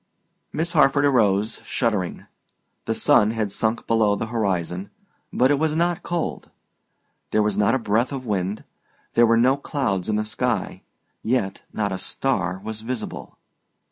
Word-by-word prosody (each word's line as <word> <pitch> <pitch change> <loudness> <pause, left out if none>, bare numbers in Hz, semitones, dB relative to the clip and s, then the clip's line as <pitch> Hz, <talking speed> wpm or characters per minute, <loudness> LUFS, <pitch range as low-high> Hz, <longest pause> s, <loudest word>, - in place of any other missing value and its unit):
Miss 165 +2 -1
Harford 145 -3 +4
arose, 110 -5 +2
shuddering; 105 -8 -1 0.6
the - - -1
sun 105 - +4
had 110 -3 -2
sunk 110 +3 -1
below 110 -3 +3
the 115 - -3
horizon, 95 -4 -1 0.4
but 130 +3 +3
it 145 - +2
was 155 0 +1
not 175 +2 +1
cold. 170 -2 -3 0.8
There 110 - +2
was 105 -1 0
not 105 +4 +3
a - - +3
breath 115 +1 0
of 135 -2 -5
wind; 100 -1 -2 0.5
there 120 0 +5
were 115 0 +4
no 130 +4 +4
clouds 120 -10 -2
in 105 - +1
the 105 0 0
sky, 120 +3 -2 0.4
yet 110 -5 -1
not 105 -2 -1
a 95 - -3
star 95 -4 -1
was 110 0 -5
visible. 115 -1 -6
110 Hz, 155 wpm, -23 LUFS, 100-130 Hz, 0.8 s, there